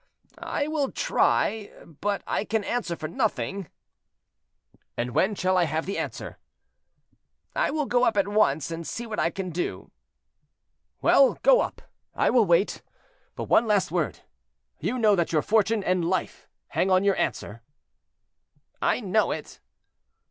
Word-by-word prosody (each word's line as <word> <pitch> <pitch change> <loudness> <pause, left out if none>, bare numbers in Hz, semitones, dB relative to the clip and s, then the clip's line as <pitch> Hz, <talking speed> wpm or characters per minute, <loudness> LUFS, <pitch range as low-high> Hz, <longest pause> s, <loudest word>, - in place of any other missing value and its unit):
"I 285 - -2
will 305 -3 -1
try, 215 -2 +1
but 200 +6 -3
I - - -1
can 220 0 -1
answer 220 -6 -2
for 155 -1 -5
nothing." 200 - -2 1.3
"And 120 +1 -2
when 200 - +1
shall 185 -1 +1
I 175 - +4
have 160 0 -2
the 195 - -3
answer?" - - -6 1.2
"I - - +1
will 300 0 -1
go 245 -1 +2
up 225 -4 +2
at 200 - +3
once 165 -8 +1
and 165 0 -5
see 235 - -5
what 220 -2 -4
I 165 - +2
can 185 0 -5
do." 175 +2 -4 1.1
"Well, - - +5
go - - +6
up; - - -5 0.3
I - - +2
will 235 -5 +4
wait. 175 +4 +2 0.5
But - - -4
one 230 - +3
last 205 -3 +2
word; - - -2 0.6
you 255 - -2
know 215 -4 +4
that 170 -3 0
your 155 -3 +2
fortune 215 0 +2
and 185 -1 +1
life 180 +2 -2 0.2
hang 190 - 0
on 185 0 +4
your 200 -1 +3
answer." 115 -2 -3 1.2
"I - - +1
know - - +1
it." - - -6
200 Hz, 155 wpm, -26 LUFS, 170-225 Hz, 1.3 s, go